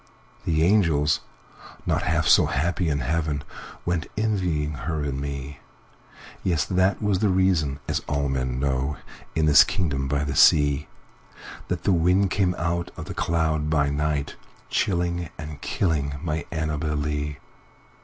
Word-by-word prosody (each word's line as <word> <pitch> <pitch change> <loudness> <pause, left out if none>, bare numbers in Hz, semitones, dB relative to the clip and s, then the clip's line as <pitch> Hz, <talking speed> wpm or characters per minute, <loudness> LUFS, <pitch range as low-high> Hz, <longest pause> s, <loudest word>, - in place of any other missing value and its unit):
The 80 -1 +2
angels, 80 -6 +3 0.7
not - - +1
half - - +1
so - - +6
happy 85 +5 0
in 70 -2 0
heaven, 75 +1 -1 0.4
Went 85 -3 -1
envying 90 -9 0
her 75 +2 -3
and 70 -1 -3
me; 70 0 -5 0.8
Yes! 85 -5 +1
that 95 +2 +1
was 100 -3 +1
the 105 - +2
reason 90 -7 +2
(as - - 0
all 70 0 0
men 65 -2 -2
know, 70 +1 -1 0.4
In 80 - +2
this 75 -3 +8
kingdom 70 -7 -1
by 70 +1 0
the 70 -1 -2
sea)That 70 0 0
the 95 - +3
wind 90 +3 +3
came 95 -3 +1
out 85 +1 -1
of - - -6
the - - -6
cloud 80 -2 0
by 70 -2 +2
night, 75 0 -1 0.3
Chilling 85 -3 0
and 75 -2 -8
killing 75 -6 -1
my 80 -2 -2
Annabel 75 -2 -2
Lee. 75 0 -2
75 Hz, 145 wpm, -24 LUFS, 70-85 Hz, 0.8 s, this